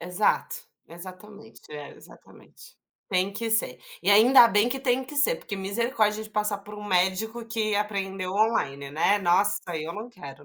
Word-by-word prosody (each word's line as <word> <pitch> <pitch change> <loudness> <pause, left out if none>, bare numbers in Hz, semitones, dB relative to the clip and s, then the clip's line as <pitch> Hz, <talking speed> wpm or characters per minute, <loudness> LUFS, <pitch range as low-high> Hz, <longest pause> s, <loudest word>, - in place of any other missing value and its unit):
Exato, 180 +4 0 0.3
exatamente, 195 +6 -13
é, 145 -1 -8
exatamente. - - -18 0.3
Tem 185 +2 0
que 225 +2 -4
ser. 225 - 0 0.2
E - - +2
ainda 235 +4 +7
bem 210 +1 +2
que 270 +2 -3
tem 260 -1 0
que 280 +3 -11
ser, 475 +13 +2
porque 210 - -7
misericórdia 215 +2 -1
de - - -11
passar 210 -1 -1
por 205 +1 -12
um 210 - -9
médico 205 +5 0
que 220 -2 -1
aprendeu 195 -3 -3
online, 140 -11 0
né. 165 +8 +2
Nossa! 195 +2 +2 0.2
Eu 160 +2 -5
não 215 +4 -7
quero, 145 - -12
205 Hz, 165 wpm, -26 LUFS, 185-225 Hz, 0.3 s, ainda